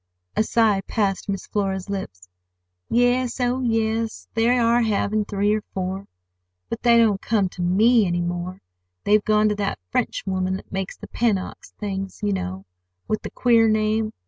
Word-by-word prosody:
A - - +3
sigh 215 -3 +2
passed 200 -2 -1
Miss 195 -1 -3
Flora's 195 -2 -2
lips. 95 - -6 0.6
"Yes, 245 +1 +2
oh, 250 +1 +1
yes; 225 -2 -1
they 225 +1 +2
are 235 0 +3
having 215 -1 0
three 205 0 +1
or 215 - 0
four. 190 +1 -3 0.6
But 230 - -4
they 235 -1 +5
don't 215 -4 +3
come 205 -4 +1
to 180 - -8
me 210 +5 +4
any 175 0 0
more. 175 +1 -4 0.4
They've 210 0 +3
gone 215 0 +3
to 210 - 0
that 200 -1 -1
French - - -1
woman 185 -1 -1
that - - -10
makes 195 0 -4
the - - -9
Pennocks' 215 -5 -2
things, 195 -1 -4
you 205 -1 +1
know, 95 - -4 0.4
with 215 - -1
the - - -6
queer 230 -2 +3
name. 215 0 +1
210 Hz, 170 wpm, -23 LUFS, 190-225 Hz, 0.6 s, they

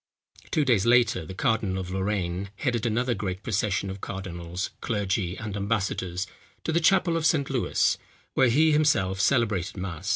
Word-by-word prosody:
Two 150 - +1
days 115 -5 +3
later, 120 -9 +3
the 95 - -7
cardinal 110 -5 0
of 90 -1 -4
Lorraine 95 -1 -2
headed 120 0 -1
another 120 +2 +1
great 95 -2 -4
procession 100 -2 0
of 95 0 -8
cardinals, 90 -1 -5
clergy, 100 -4 -1
and 110 -3 -5
ambassadors, 100 -3 -1 0.4
to - - -1
the 165 - +3
chapel 175 0 +3
of 165 - 0
St. 155 -4 +2
Lewis, 130 -3 +1 0.3
where 130 -2 +4
he 155 +6 +4
himself 120 -12 +2
celebrated 105 -6 +1
mass. 90 0 -4
105 Hz, 160 wpm, -26 LUFS, 95-125 Hz, 0.4 s, where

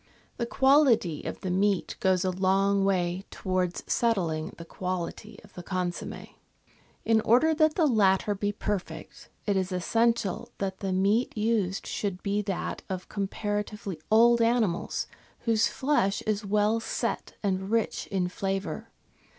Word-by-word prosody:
The 235 - -2
quality 265 - +4
of - - -5
the 185 - -2
meat 195 +1 +1
goes 185 -1 +2
a 185 - +1
long 195 +2 +2
way. 185 -1 0
towards 185 -2 -2
settling 170 -9 0
the 170 - -9
quality 185 +4 -5
of 205 - -18
the 180 - -8
consomme. 180 -1 -4 0.8
In 225 -1 +4
order 285 +8 +4
that 310 0 +3
the 330 - +3
latter 205 -5 +3
be 205 +1 -1
perfect, 205 -2 -5 0.2
it 205 - +1
is 190 0 0
essential 225 +2 0
that 190 -1 -3
the 195 -2 -2
meat 200 +6 +1
used 210 -4 0
should 195 -3 -3
be 205 +1 0
that 195 -2 -3
of 185 -1 -5
comparatively 205 -2 -3
old 235 +2 +6
animals 230 -6 +1 0.4
whose 225 -2 +2
flesh 260 -8 0
is 215 0 -1
well 210 +2 +2
set 225 - -3
and 190 -1 -1
rich 225 0 0
in 185 -3 0
flavour. 195 +1 -3
200 Hz, 140 wpm, -28 LUFS, 185-225 Hz, 0.8 s, old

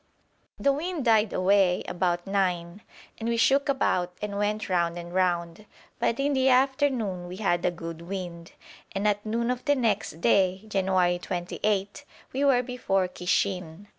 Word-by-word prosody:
The 280 - +3
wind 320 0 -3
died 220 -2 +4
away 185 -1 +3
about 175 -1 -1
nine, 185 -1 -1 0.4
and 230 +1 -2
we 235 - 0
shook 275 +5 +3
about 180 -10 0
and 210 -1 -4
went 210 +1 -1
round 175 -2 0
and 175 0 -8
round; 175 +1 -1 0.3
but 230 - 0
in 285 +1 +1
the 265 0 +3
afternoon 255 -8 +1
we 180 - -7
had 185 -4 0
a - - +4
good 165 -1 -7
wind, 175 -2 -7 0.4
and 195 +2 0
at 205 0 +1
noon 235 +2 -1
of 250 0 -4
the 290 -1 +3
next 230 - -1
day 190 -1 +2
(January 185 -3 +1
28) 195 +6 -2 0.3
we 270 +2 0
were 260 -3 +4
before 210 -7 0
Kishin. 180 0 -2
195 Hz, 160 wpm, -27 LUFS, 180-235 Hz, 0.4 s, died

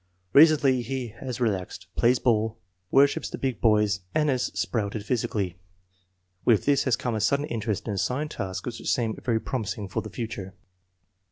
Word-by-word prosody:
Re 150 - +10
cently 140 -5 +2
he 125 0 -4
has 130 -2 -5
relaxed, 100 -7 -2
plays 125 +2 +4
ball, 110 -2 +1 0.3
worships 140 +1 +3
the - - -5
big 130 -4 -2
boys, 105 -3 +3 0.2
and 150 -1 +3
has 130 -2 +1
sprouted 100 +2 -2
physically. 105 -7 -1 0.8
With 115 -4 +3
this 140 -1 +3
has 130 -4 +3
come 120 +1 -3
a 110 - -1
sudden 140 +8 +2
interest 115 -7 -3
in 105 - -1
assigned 125 +10 -1
tasks 95 -7 -4
which 120 -2 -4
seems 115 -3 0
very 115 -3 +1
promising 105 -4 -3
for 95 - -2
the 110 - -8
future." 105 -4 -6
115 Hz, 170 wpm, -26 LUFS, 105-130 Hz, 0.8 s, Re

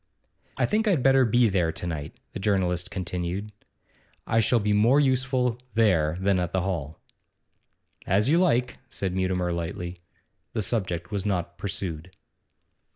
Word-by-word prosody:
'I - - +2
think 220 +1 +1
I'd 170 -11 +2
better 135 -1 +5
be 120 +1 +4
there 90 -5 +1
to 90 - -5
night,' 80 -4 -5 0.2
the - - -5
journalist 95 -3 0
continued. 90 +3 -4 0.7
'I 115 - +2
shall 115 +2 +3
be 105 -1 +1
more 115 +7 +4
useful 130 -3 +1 0.2
there 90 -8 +3
than 95 -1 +2
at 90 -1 -2
the 95 - +1
hall.' 80 -6 -3 1.1
'As 100 +4 +2
you 160 +5 +4
like,' 125 -9 +1
said 95 -7 -3
Mutimer 90 -1 0
lightly. 85 +1 -5 0.5
The 110 - -1
subject 90 -6 -2
was 100 -2 -2
not 90 -4 -2
pursued. 90 -4 -3
95 Hz, 150 wpm, -26 LUFS, 90-120 Hz, 1.1 s, better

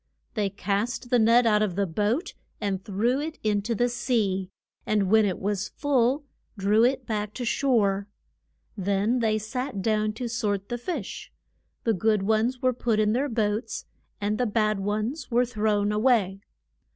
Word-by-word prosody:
They 210 -4 0
cast 205 +5 -2
the 245 - +5
net 230 +2 +5
out 210 -2 +4
of 200 -5 0
the 200 0 +1
boat 210 - -1 0.3
and 195 -2 -2
threw 230 +6 0
it 315 +1 -5
in 210 -2 +1
to 230 +3 -2
the 245 +3 +2
sea, 225 -6 0 0.3
and 205 -3 +1
when 220 -1 +6
it 190 -3 -1
was 205 0 -2
full 275 0 +1 0.3
drew 205 +3 +3
it 255 +1 +2
back 210 -2 -3
to 250 - -3
shore. 210 -6 +1 0.7
Then 200 +4 +1
they 220 -2 +2
sat 220 0 -4
down 215 0 +1
to 240 +3 -4
sort 210 -4 -2
the 240 - -3
fish; 340 +9 -5 0.5
the 225 - +2
good 210 +1 +1
ones 220 +5 +1
were 255 0 +3
put 230 -2 0
in 215 0 +3
their 275 +4 0
boats, 220 0 -1 0.3
and 210 +2 -1
the 250 - +2
bad 215 -1 +1
ones 215 +8 -2
were 245 +1 +3
thrown 210 -3 0
a 210 - 0
way. 215 -6 +2
215 Hz, 175 wpm, -26 LUFS, 205-245 Hz, 0.7 s, when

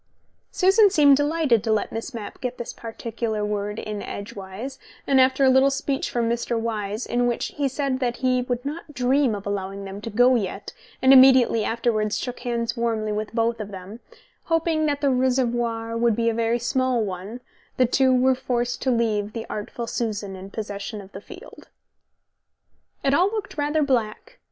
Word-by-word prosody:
Susan 390 +3 +5
seemed 290 -7 +6
delighted 290 -6 +2
to 225 - 0
let 215 - 0
Miss 225 +4 -5
Mapp 225 -5 -8
get 250 -1 -3
this 240 - -6
particular 225 -1 -4
word 210 0 -3
in 210 -2 -5
edgewise, 200 +6 -7 0.3
and 265 -1 +4
after 260 +1 +3
a - - +6
little 265 +1 +5
speech 275 0 -2
from 235 -1 -1
Mr. 235 0 -1
Wyse, 215 -1 -3
in 245 0 0
which 240 - -1
he 285 -2 0
said 265 -1 -2
that 245 -2 -1
he 255 -1 +1
would 245 0 -3
not 300 0 -6
dream 255 -1 +2
of 200 - -8
allowing 200 0 -4
them 195 +1 -7
to 230 - -5
go 245 +4 +4
yet, 205 -4 -3 0.3
and 260 +1 +7
immediately 255 -4 +6
afterwards 220 -2 0
shook 250 -1 -5
hands 235 -1 -2
warmly 225 -2 -1
with 210 +1 -2
them 230 -2 -1
both, 195 +3 -9 0.5
hoping 325 -1 +1
that 285 -1 -1
the 280 -2 +3
reservoir 240 -3 0
would 230 -1 +2
be 230 +1 +1
a - - 0
very 230 +1 +1
small 250 0 0
one, 195 +5 -6 0.4
the 255 - +5
two 260 +2 +3
were 255 +1 +4
forced 245 -2 -2
to 265 - 0
leave 215 -4 0
the 225 -1 -5
artful 215 +3 -5
Susan 210 -4 -3
in 190 +1 -9
possession 205 0 -6
of 195 -1 -12
the 195 - -9
field.... 380 - -13 1.4
It 275 - +2
all 355 +6 +4
looked 415 -1 -4
rather 295 +1 +1
black. 265 - -2
235 Hz, 180 wpm, -24 LUFS, 215-265 Hz, 1.4 s, and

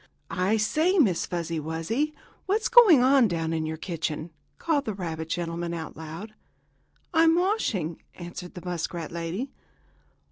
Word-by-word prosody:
"I 195 +4 +1
say, 315 - +2
Miss 200 - +3
Fuzzy 170 -2 -2
Wuzzy, 165 - -2 0.3
what's 425 +4 +1
going 390 - +8
on 260 -2 +5
down 165 -3 -2
in 160 -1 -1
your 160 0 -4
kitchen?" 165 -1 -4 0.3
called 300 -4 0
the 215 - -3
rabbit 160 -4 -5
gentleman 170 0 -2
out 160 -2 -6
loud. 160 +7 -8 0.8
"I'm 325 0 +5
washing," 295 - 0
answered 175 0 -8
the 180 - -9
muskrat 170 -1 -3
lady. 170 +10 -4
180 Hz, 140 wpm, -27 LUFS, 165-275 Hz, 0.8 s, going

